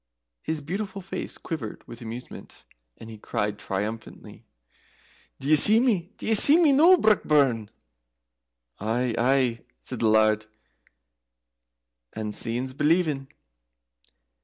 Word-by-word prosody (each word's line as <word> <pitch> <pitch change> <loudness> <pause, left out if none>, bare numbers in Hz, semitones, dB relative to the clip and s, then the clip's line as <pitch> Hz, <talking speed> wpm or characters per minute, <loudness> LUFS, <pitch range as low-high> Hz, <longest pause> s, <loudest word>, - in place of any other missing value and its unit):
His 160 -1 -4
beautiful 195 +6 -5
face 190 - -6
quivered 135 -11 -7
with 120 - -11
amusement, 115 +2 -10 0.3
and 110 - -12
he 110 -1 -11
cried 105 0 -3
triumphantly, 105 +3 -7 0.9
"D'ye 140 +3 +1
see 210 +9 +6
me? 210 -8 0
d'ye 225 - -1
see 285 +9 +7
me 330 -4 +4
noo, 330 +7 +6
Brockburn?" 145 - +1 1.1
"Aye, 115 +3 -2
aye," 125 -1 +1 0.2
said 125 - -7
the 115 - +1
Laird; 110 0 +2 1.7
"and 105 -1 -5
seein's 120 +4 -3
believin'." 150 -1 0
130 Hz, 110 wpm, -25 LUFS, 110-180 Hz, 1.7 s, see